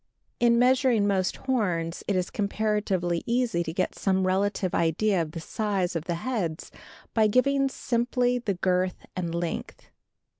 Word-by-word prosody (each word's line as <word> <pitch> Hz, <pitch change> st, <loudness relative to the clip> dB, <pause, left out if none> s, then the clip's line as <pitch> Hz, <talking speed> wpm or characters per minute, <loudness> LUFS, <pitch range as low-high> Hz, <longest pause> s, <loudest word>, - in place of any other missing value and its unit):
In 235 Hz, -1 st, +4 dB
measuring 250 Hz, -3 st, +4 dB
most 190 Hz, -3 st, +1 dB
horns 180 Hz, -10 st, -1 dB
it 200 Hz, -, +1 dB
is 180 Hz, -1 st, -1 dB
comparatively 200 Hz, -4 st, 0 dB
easy 235 Hz, -6 st, +1 dB
to 170 Hz, -, -3 dB
get 185 Hz, +3 st, -1 dB
some 190 Hz, -1 st, +1 dB
relative 190 Hz, 0 st, 0 dB
idea 170 Hz, +4 st, +2 dB
of 155 Hz, -1 st, -5 dB
the 165 Hz, -, -5 dB
size 195 Hz, 0 st, -2 dB
of 165 Hz, -1 st, -2 dB
the 170 Hz, -, -1 dB
heads 190 Hz, -11 st, -2 dB, 0.4 s
by 220 Hz, -2 st, +4 dB
giving 275 Hz, +4 st, +2 dB
simply 245 Hz, 0 st, 0 dB
the 205 Hz, -5 st, -2 dB
girth 180 Hz, 0 st, 0 dB
and 170 Hz, -2 st, -3 dB
length. 170 Hz, -1 st, -5 dB
200 Hz, 150 wpm, -26 LUFS, 175-235 Hz, 0.4 s, In